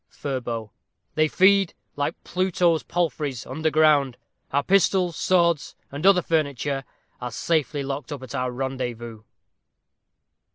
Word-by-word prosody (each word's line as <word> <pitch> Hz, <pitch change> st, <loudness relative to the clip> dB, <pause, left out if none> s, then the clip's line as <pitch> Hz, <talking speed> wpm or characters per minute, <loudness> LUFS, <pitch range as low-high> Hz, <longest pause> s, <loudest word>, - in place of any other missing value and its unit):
Furbo. 120 Hz, -6 st, -4 dB, 0.4 s
They 155 Hz, 0 st, +3 dB
feed, 195 Hz, +2 st, +4 dB, 0.2 s
like 145 Hz, +3 st, -1 dB
Pluto's 180 Hz, -3 st, +1 dB
palfreys, 150 Hz, -7 st, -2 dB
under 160 Hz, 0 st, -1 dB
ground. 150 Hz, -5 st, +3 dB, 0.3 s
Our 140 Hz, +1 st, +1 dB
pistols, 185 Hz, -2 st, +2 dB
swords, 170 Hz, -4 st, +2 dB, 0.2 s
and 145 Hz, +7 st, 0 dB
other 185 Hz, -3 st, +6 dB
furniture, 140 Hz, -3 st, -1 dB, 0.4 s
Are 125 Hz, -, -3 dB
safely 150 Hz, +2 st, -1 dB
locked 135 Hz, +1 st, -5 dB
up 140 Hz, -3 st, -6 dB
at 130 Hz, -, -9 dB
our 125 Hz, 0 st, -1 dB
rendezvous. 120 Hz, -3 st, -4 dB
145 Hz, 120 wpm, -24 LUFS, 130-170 Hz, 0.4 s, other